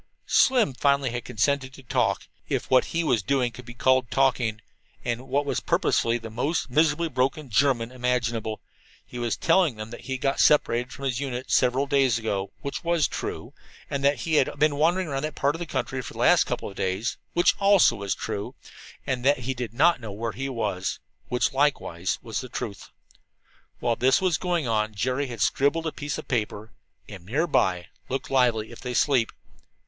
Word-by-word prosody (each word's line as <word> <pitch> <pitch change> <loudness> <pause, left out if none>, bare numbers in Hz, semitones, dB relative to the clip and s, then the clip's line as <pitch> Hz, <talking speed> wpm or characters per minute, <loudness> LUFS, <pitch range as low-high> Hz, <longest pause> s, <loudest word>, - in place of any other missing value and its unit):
Slim 245 - +4
finally 140 0 +2
had 120 0 -4
consented 130 +4 0
to 135 - -14
talk 120 - 0 0.2
if - - -2
what 130 - +5
he 170 +1 -1
was 125 -8 +2
doing 125 +3 0
could 125 +1 -12
be 120 - -9
called 130 -1 +2
talking. 120 -3 +1 0.5
And 120 -1 -1
in 130 - -13
what 140 +2 0
was - - -1
purposely 115 0 +1
the 115 -1 -9
most 135 +4 -1
miserably 155 +3 +2
broken 135 0 -1
German 120 0 +2
imaginable, 125 -3 -1 0.4
he 125 - -8
was 120 -1 -1
telling 165 -6 +3
them 110 +1 -8
that 120 - -10
he 130 - -1
got 135 +2 -1
separated 125 -4 +3
from 140 - -7
his 130 -2 -1
unit 130 -2 -4
several 130 +2 +3
days 135 -4 +2
ago 100 -3 -2
(which 140 - -4
was 170 -3 +2
true), - - -5 0.4
and 140 -1 -2
that 140 -3 +2
he 160 -2 +1
had 135 - +1
been 150 0 +3
wandering 170 +5 +2
about 135 -2 -2
that 155 0 -4
part 140 +1 +1
of 165 - -7
the 175 - -5
country 130 -1 -2
for - - -9
the - - -10
last - - +5
couple - - -3
of 100 - -9
days 95 +6 -2 0.2
(which 175 - +4
also 200 -2 +5
was 100 -1 -2
true), 100 0 -5 0.5
and 130 -2 -2
that 140 -1 +3
he 130 +2 -2
did 120 -4 -5
not 160 +4 +3
know 110 -3 -6
where 110 +3 -3
he 135 +3 -4
was 105 -7 -2 0.3
(which 125 +1 0
likewise 135 - 0
was 115 - -3
the 130 - -9
truth). 100 -3 -6 0.9
While 120 -1 0
this 130 +1 +4
was 185 -5 +1
going 175 -6 -1
on 110 -1 0
Jerry 130 +7 -1
had 120 -4 -7
scribbled 145 +7 +2
upon 160 - -2
a - - -11
piece 145 -1 -2
of - - -8
paper: 110 -2 -2 0.4
"Am 95 -4 -10
near. 135 - 0 0.6
Look 135 +1 -3
lively 120 -4 +2
if 115 - -11
they 125 -1 -4
sleep." 130 -5 +2
130 Hz, 200 wpm, -25 LUFS, 115-145 Hz, 0.9 s, what